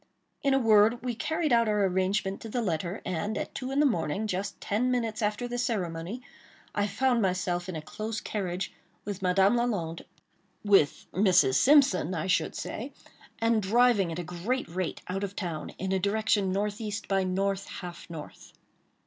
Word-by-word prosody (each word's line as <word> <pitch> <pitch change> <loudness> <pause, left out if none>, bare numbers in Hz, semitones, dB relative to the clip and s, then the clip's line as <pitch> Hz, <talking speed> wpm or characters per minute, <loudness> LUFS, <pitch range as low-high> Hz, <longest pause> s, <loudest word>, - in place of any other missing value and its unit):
In 275 -2 +3
a - - +5
word, 225 0 +4
we 250 -1 -1
carried 310 +3 0
out 235 -1 +4
our 210 -1 +2
arrangement 190 +1 0
to 225 - -7
the 240 +2 -1
letter, 175 0 -2
and, 185 +5 -2
at - - -4
two 260 -2 -4
in 270 +1 0
the 300 - +5
morning, 195 - 0
just 200 0 -3
ten 225 +5 0
minutes 230 -3 -1
after 210 +3 -1
the 245 0 -3
ceremony, 195 -1 -2 0.5
I 205 0 +1
found 245 +3 +1
myself 180 -2 -1
in 180 - -4
a 155 - -5
close 215 +6 -4
carriage 185 -3 -3 0.3
with 200 -1 -5
Madame 190 +3 +4
Lalande—with 200 -4 -1
Mrs. 185 -8 +4
Simpson, 200 - +4
I - - -2
should 185 -3 +1
say—and 230 -2 -3
driving 210 -3 +3
at 165 - -4
a 175 - -3
great 180 +10 -2
rate 180 0 -3
out 195 +2 -3
of 200 0 -4
town, 165 -5 -4
in 190 +1 -3
a 190 - +2
direction 205 0 +1
northeast 205 +2 -2
by 195 -1 +2
north, 195 +1 -1
half 175 -2 -8
north. 160 -3 -10
200 Hz, 170 wpm, -28 LUFS, 185-230 Hz, 0.5 s, a